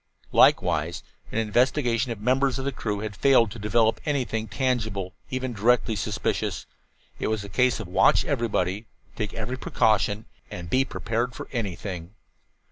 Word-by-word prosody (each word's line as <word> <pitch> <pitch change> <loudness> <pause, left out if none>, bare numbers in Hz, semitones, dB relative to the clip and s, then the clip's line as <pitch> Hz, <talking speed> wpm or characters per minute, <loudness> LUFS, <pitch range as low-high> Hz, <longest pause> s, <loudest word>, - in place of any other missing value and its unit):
Likewise 85 +3 +3 0.3
an - - -3
investigation 120 +2 +1
of 115 - -4
the 105 - -11
members 130 +1 +2
of 135 - -4
the 140 - 0
crew 105 -5 -3
had 105 -1 -5
failed 120 -1 +4
to 115 - -8
develop 110 +1 +2
anything 125 -7 -1
tangible, 110 -5 -1 0.2
even 130 -1 -3
directly 115 +1 +2
suspicious. 100 - -2 0.5
It - - -1
was 110 -2 -1
a 100 - -8
case 125 +5 +2
of 110 - -6
watch 90 - +4
everybody, 110 - -1 0.3
take 105 -2 -3
every 120 +4 -3
precaution, 110 -3 +1 0.2
and 85 -1 -7
be 135 +1 +3
prepared 120 0 -2
for - - -7
anything. 95 -5 -4
115 Hz, 155 wpm, -25 LUFS, 105-125 Hz, 0.5 s, failed